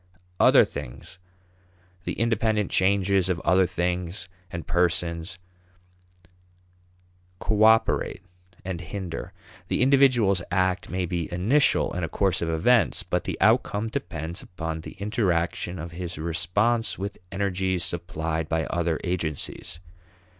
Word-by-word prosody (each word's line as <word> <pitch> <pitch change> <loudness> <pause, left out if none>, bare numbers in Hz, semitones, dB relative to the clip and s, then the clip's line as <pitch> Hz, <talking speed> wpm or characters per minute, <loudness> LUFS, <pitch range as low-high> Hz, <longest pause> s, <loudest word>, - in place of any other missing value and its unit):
Other - - +7
things, 70 +6 -9 0.9
the - - -2
independent 110 -2 0
changes 95 0 +2
of 90 -3 0
other 95 0 +3
things 90 +2 -2 0.2
and 85 -1 -6
persons, 85 0 0 2.0
cooperate 110 -1 +3 0.4
and 90 -3 -4
hinder. 90 0 -6 0.4
The - - +1
individual's 125 -8 +4
act 95 0 0
may 90 0 -1
be 85 -2 -3
initial 110 +12 +2
in 90 - -3
a 80 - -2
course 95 0 +1
of 85 - -1
events, 105 +9 +3
but - - -2
the - - -4
outcome 105 +2 +2
depends 85 - -5
upon 80 -2 -5
the - - -9
interaction 95 -4 -1
of 85 +1 -6
his 85 0 -5
response 100 +9 0
with 100 +1 -5
energies 95 -2 -1
supplied 80 -2 -3
by 80 0 0
other 85 -2 -1
agencies. 85 -2 -3
90 Hz, 120 wpm, -25 LUFS, 85-100 Hz, 2.0 s, Other